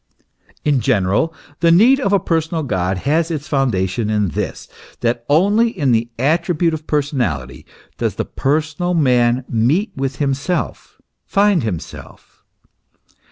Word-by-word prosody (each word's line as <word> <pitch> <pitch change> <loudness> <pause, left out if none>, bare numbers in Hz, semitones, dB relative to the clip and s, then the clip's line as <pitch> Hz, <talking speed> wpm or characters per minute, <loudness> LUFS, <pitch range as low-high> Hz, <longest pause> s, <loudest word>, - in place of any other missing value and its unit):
In 145 -3 +3
general, 110 - +1 0.3
the 170 - +3
need 230 +11 +5
of 225 -8 0
a 200 - +4
personal 160 -1 -1
God 95 -7 -1
has 155 - 0
its 155 -3 -4
foundation 110 -6 0
in 105 -3 +1
this, - - -4 0.3
that 120 0 0
only 205 +10 +3
in 150 - 0
the 115 0 +1
attribute 165 +5 +1
of 155 0 -6
personality 125 - -2 0.3
does - - -1
the - - -2
personal 155 +5 -1
man 125 -4 +2
meet 135 - +1
with 135 0 -3
himself, 140 - -2 0.3
find 200 -3 +3
himself. 100 -9 -7
140 Hz, 130 wpm, -18 LUFS, 120-165 Hz, 0.3 s, need